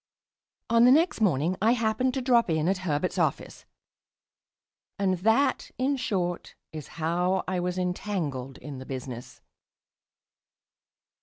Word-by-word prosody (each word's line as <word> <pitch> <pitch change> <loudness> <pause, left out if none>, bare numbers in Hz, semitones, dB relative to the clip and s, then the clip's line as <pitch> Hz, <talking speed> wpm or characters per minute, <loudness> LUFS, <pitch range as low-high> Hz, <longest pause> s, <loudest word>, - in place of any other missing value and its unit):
On 230 +1 +6
the 250 - +7
next 320 -2 +3
morning 170 -2 +2
I 225 +3 +4
happened 240 +2 0
to 265 - -2
drop 240 -5 +3
in 160 0 +1
at 190 0 +1
Herbert's 175 -1 -1
office.... - - -2 1.3
And 190 -3 0
that, 225 +9 +2
in 265 +3 +1
short, 185 -9 -3 0.2
is 155 -3 -7
how 175 +3 0
I 185 -1 -1
was 180 +1 -2
entangled 175 -8 -3
in 140 -3 -8
the 130 - -9
business. 130 -2 -7
185 Hz, 130 wpm, -27 LUFS, 160-230 Hz, 1.3 s, the